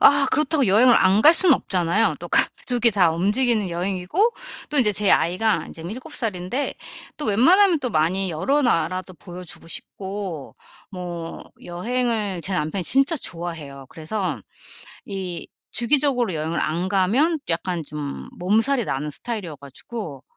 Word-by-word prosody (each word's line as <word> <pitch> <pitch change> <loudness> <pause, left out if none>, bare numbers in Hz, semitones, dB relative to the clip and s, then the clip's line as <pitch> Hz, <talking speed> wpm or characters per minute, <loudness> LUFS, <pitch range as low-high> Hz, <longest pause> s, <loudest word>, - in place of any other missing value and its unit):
아 280 0 +6
그렇다고 300 -3 +1
여행을 230 +6 +6
안 195 +3 +4
갈 310 - +8
수는 345 -4 +6
없잖아요. 185 +1 +1
또 - - -7
가족이 240 -2 +1
다 185 -4 +4
움직이는 210 +5 +1
여행이고 185 - 0 0.4
또 295 - +1
인제 210 -4 +4
제 205 0 +1
아이가 190 +6 +2
인제 165 - -10
7 215 +10 -8
살인데 215 +5 -2 0.4
또 300 - -5
웬만하면 330 - +4
또 250 -3 -2
많이 185 +3 +1
여러 270 - +1
나라도 185 -4 0
보여주고 180 0 -10
싶고 190 -3 -6 0.4
뭐 175 -3 -7 0.2
여행을 210 0 -2
제 190 - -2
남편이 175 +2 -1
진짜 275 - +3
좋아해요. 165 - -6
그래서 185 +6 -4 0.7
이 190 -3 -5 0.2
주기적으로 245 - +2
여행을 160 +2 -2
안 170 +4 -1
가면 245 - +2
약간 170 0 -2
좀 145 -2 -6
몸살이 225 +7 +1
나는 150 +3 -3
스타일이어 200 -2 -5
가지고 140 - -8
195 Hz, 310 characters per minute, -22 LUFS, 170-245 Hz, 0.7 s, 갈